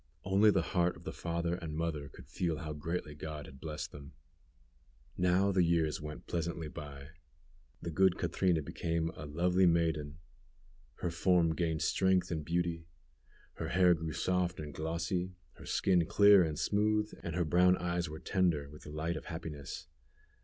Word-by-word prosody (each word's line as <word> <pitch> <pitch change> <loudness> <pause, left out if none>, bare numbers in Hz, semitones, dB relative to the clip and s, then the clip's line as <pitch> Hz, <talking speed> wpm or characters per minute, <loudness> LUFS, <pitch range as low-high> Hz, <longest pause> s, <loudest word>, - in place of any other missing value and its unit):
Only 100 +3 +5
the - - +3
heart 90 -2 +1
of - - -14
the 95 - -4
father 85 0 -2
and 85 -4 -5
mother 80 -4 -2
could 65 - -14
feel 80 +1 -1
how 75 0 -5
greatly 75 0 -4
God 75 0 -6
had 65 - -13
blessed 75 -2 -5
them. 70 -1 -11 1.0
Now 90 +2 +3
the 95 -1 +3
years 85 -3 +1
went 75 0 -7
pleasantly 85 -1 -3
by. 70 -1 -9 0.7
The 85 - -3
good 95 +3 +3
Catrina 90 -2 +1
become 80 +2 -2
a 75 - -7
lovely 90 +5 +3
maiden. 80 -3 +1 0.8
Her 85 - -1
form 85 -1 +3
gained 80 -1 -1
strength 95 -1 +2
and 80 -2 -2
beauty. 85 0 -1 0.7
Her - - -3
hair 90 -1 +5
grew 80 -1 -3
soft 90 +2 0
and 75 -2 -6
glossy; 85 +4 -2 0.2
her - - -11
skin 90 -4 +2
clear 100 -1 +7
and 80 -3 0
smooth, 105 +2 +1
and 85 -2 -4
her 90 -2 +1
brown 90 +3 +4
eyes 85 -1 -1
were 80 - -6
tender 85 -7 0
with 75 - -12
the - - -10
light 80 +3 -2
of - - -6
happiness. 80 -4 -6
85 Hz, 165 wpm, -33 LUFS, 75-90 Hz, 1.0 s, clear